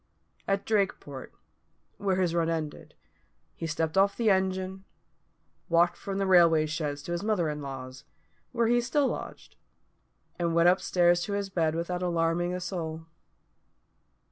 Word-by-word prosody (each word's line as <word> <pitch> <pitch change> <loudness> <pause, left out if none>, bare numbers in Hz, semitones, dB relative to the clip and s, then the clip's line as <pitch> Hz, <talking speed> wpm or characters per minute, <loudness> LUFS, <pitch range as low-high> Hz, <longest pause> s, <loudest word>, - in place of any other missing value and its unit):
At 195 0 0
Drakeport, 190 -10 -2 0.7
where 195 -2 0
his 180 -3 +1
run 165 -1 +1
ended, 160 -3 -4 0.6
he 165 - -5
stepped 160 +3 0
off 200 +1 +3
the 225 -3 +3
engine, 190 0 -1 0.9
walked 170 +1 +3
from 195 -1 -5
the 195 - 0
railway 170 -4 +5
sheds 150 -2 -3
to 175 - -6
his 175 - -2
mother 200 -6 0
in 150 0 -6
law's, 130 -2 -8 0.5
where 235 -1 +1
he 240 +1 +3
still 270 +4 +1
lodged, - - -7 0.8
and 170 -1 0
went 170 +1 +6
up 185 - +2
stairs 175 -1 +3
to 205 - -4
his 200 -1 -2
bed 160 -3 +1
without 175 +2 -3
alarming 170 0 0
a 180 - -3
soul. 165 -3 -5
175 Hz, 150 wpm, -28 LUFS, 160-195 Hz, 0.9 s, went